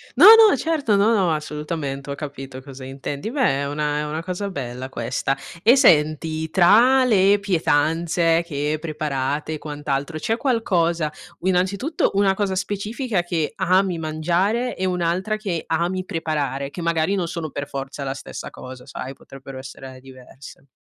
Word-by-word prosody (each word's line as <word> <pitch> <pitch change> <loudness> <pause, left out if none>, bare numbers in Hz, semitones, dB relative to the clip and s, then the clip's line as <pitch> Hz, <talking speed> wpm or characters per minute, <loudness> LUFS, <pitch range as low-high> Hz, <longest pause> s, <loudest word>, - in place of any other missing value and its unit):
No, - - +8
no 445 -5 +7
certo, 285 -7 0
no, 205 +3 +4
no 185 -6 +2
assolutamente 150 -2 -4
ho 140 - -3
capito 135 -3 -7
cosa 135 -1 -10
intendi. 140 +6 -5
Beh 255 - +1
è - - -2
una 150 0 -1
è 150 - -2
una 155 +2 -4
cosa 185 +3 -4
bella 130 -6 -5
questa. 130 +2 -2 0.3
E 235 +7 +6
senti 160 - +3
tra 230 +9 +5
le 205 -4 +4
pietanze 165 -1 +1
che 150 -1 -2
preparate 150 -2 -3
e - - -3
quant'altro 145 0 -4
c'è 225 +8 -1
qualcosa 170 - 0 0.3
u 180 - -3
innanzitutto 195 - +1
una 195 -1 +3
cosa 195 -1 -1
specifica 205 +2 -2
che 170 -3 -2
ami 185 -1 +2
mangiare 175 +10 0
e 190 - -1
un'altra 180 +3 0
che 195 -6 -4
ami 175 +3 -1
preparare, 150 -6 -2
che 175 - -8
magari 170 +3 +1
non 180 -3 -1
sono 165 -2 -4
per 145 +1 -5
forza 140 0 -6
la 135 - -2
stessa 135 - -8
cosa, 130 0 -10
sai, 130 +1 -7
potrebbero 135 0 -12
essere 130 0 -10
diverse? 130 +1 -14
165 Hz, 160 wpm, -22 LUFS, 140-190 Hz, 0.3 s, No